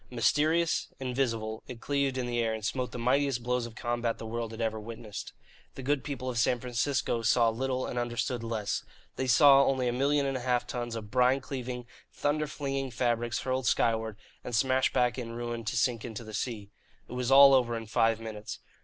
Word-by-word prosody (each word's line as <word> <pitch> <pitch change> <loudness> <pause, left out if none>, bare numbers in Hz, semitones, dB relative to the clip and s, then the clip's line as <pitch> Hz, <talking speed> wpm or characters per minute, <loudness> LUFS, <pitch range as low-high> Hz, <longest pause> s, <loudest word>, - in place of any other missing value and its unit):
Mysterious, 155 +7 +2
invisible, 120 -4 -2
it 125 -2 -8
cleaved 140 0 0
the 120 -1 -1
air 115 -1 +1
and 110 -1 -6
smote 125 0 -2
the - - -6
mightiest 130 +1 +1
blows 125 -1 0
of 115 - -13
combat 120 -1 -1
the - - -8
world 115 0 -3
had 110 0 -9
ever 110 -1 -1
witnessed. 110 -2 -7 0.4
The 135 - -7
good 140 +1 0
people 135 -3 -5
of 125 -2 -1
San 120 +2 +2
Francisco 120 -1 -1
saw 115 +1 +4
little 130 +2 -1
and 125 - -3
understood 120 0 -2
less. 115 -3 -2 0.3
They 130 - -2
saw 140 +2 +7
only 130 -2 +1
a 120 - 0
million 140 +3 +2
and 135 -1 -1
a - - -6
half 125 -1 +1
tons 120 -2 -4
of 105 -2 -7
brine 125 +1 +4
cleaving, 125 -2 -5 0.3
thunder 150 +1 0
flinging 135 -2 -3
fabrics 120 -1 0
hurled 130 -1 -1
skyward 110 -3 +1 0.3
and 120 - -3
smashed 130 +2 +2
back 125 +1 +1
in 115 -2 -5
ruin 120 0 -4
to 110 - -2
sink 120 -3 +1
into 115 -1 -6
the 110 -1 -10
sea. 105 -3 -4 0.4
It - - -9
was 125 0 -2
all 135 0 +9
over 120 -3 +3
in 115 - -6
five 115 0 +2
minutes. 110 -2 -6
120 Hz, 200 wpm, -29 LUFS, 115-130 Hz, 0.4 s, all